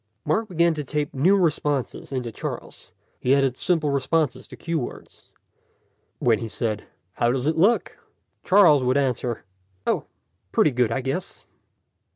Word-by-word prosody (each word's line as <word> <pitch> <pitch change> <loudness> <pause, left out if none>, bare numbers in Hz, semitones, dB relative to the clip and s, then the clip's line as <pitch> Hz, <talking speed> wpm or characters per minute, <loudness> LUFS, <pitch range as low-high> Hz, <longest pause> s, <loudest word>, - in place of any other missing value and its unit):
Mark 215 +9 0
began 170 -1 +3
to 150 -1 -4
tape 150 +1 -3
new 175 +9 +4
responses 150 -8 -1
into 125 -3 -3
Charles. - - -7 0.3
He 130 +2 +3
added 135 -3 +2
simple 155 -1 0
responses 145 +3 0
to - - -11
cue 165 -1 -2
words. 125 - -9 0.9
When 115 -3 +2
he 115 -1 -5
said, 110 -1 -3 0.3
"How 120 +4 +1
does 130 0 -1
it 155 +1 +1
look?" 200 +9 +2 0.4
Charles 185 -8 +6
would 130 +2 +2
answer, 125 -3 -1 0.4
"Oh, - - 0 0.5
pretty 155 - +3
good, 125 -2 +1
I 115 - -1
guess." 135 +9 -4
140 Hz, 150 wpm, -24 LUFS, 125-165 Hz, 0.9 s, Charles